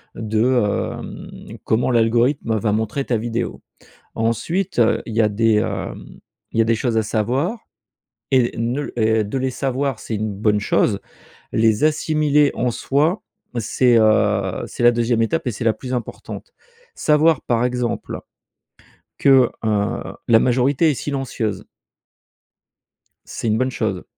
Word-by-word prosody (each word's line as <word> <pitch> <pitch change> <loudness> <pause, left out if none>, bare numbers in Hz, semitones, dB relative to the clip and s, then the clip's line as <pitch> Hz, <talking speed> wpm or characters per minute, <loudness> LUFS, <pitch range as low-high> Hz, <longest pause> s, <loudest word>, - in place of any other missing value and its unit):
de, 110 0 0
hem, 120 -5 -2
comment 110 +3 +1
l'algorithme, 115 +1 +2
va 105 0 0
montrer 110 +6 -1
ta 120 - 0
vidéo. 115 +1 -3 0.5
Ensuite, 165 - -1
heu, 115 -1 +3
il 115 - -6
y 115 - +2
a 110 - +4
des, 110 +2 +2
hem, - - -4 0.3
il - - -3
y 115 - +6
a - - +1
des 115 +1 +2
choses 115 0 -1
à 110 - +3
savoir 130 - -1 0.7
et 130 -3 +3
ne 120 +5 -2
et 110 -1 +2
de 105 +7 -3
les 130 0 -1
savoir, 135 -1 -2
c'est 115 - -5
une 105 0 -2
bonne 105 +1 +1
chose. 105 0 +1 0.5
Les 110 +4 +2
assimiler, 150 -1 +2
en 125 +1 0
soi, 145 - 0 0.4
c'est, 120 +2 +2
heu, 105 -3 +2
c'est - - -6
la 120 0 +6
2e 115 0 +1
étape 160 +7 -1
et - - +1
c'est 110 - -5
la 115 - +4
plus 130 +3 -6
importante. 125 - -6 0.4
Savoir 155 -1 +3
par 120 0 0
exemple 125 -1 -2 1.0
que, 135 -3 +5 0.2
heu, 105 -2 0 0.3
la 115 -1 +6
majorité 130 +6 +2
est - - -1
silencieuse 125 -8 -3 1.6
c'est - - -5
une 110 0 +2
bonne 130 +2 0
chose. 105 -7 -2
120 Hz, 150 wpm, -20 LUFS, 110-135 Hz, 1.6 s, y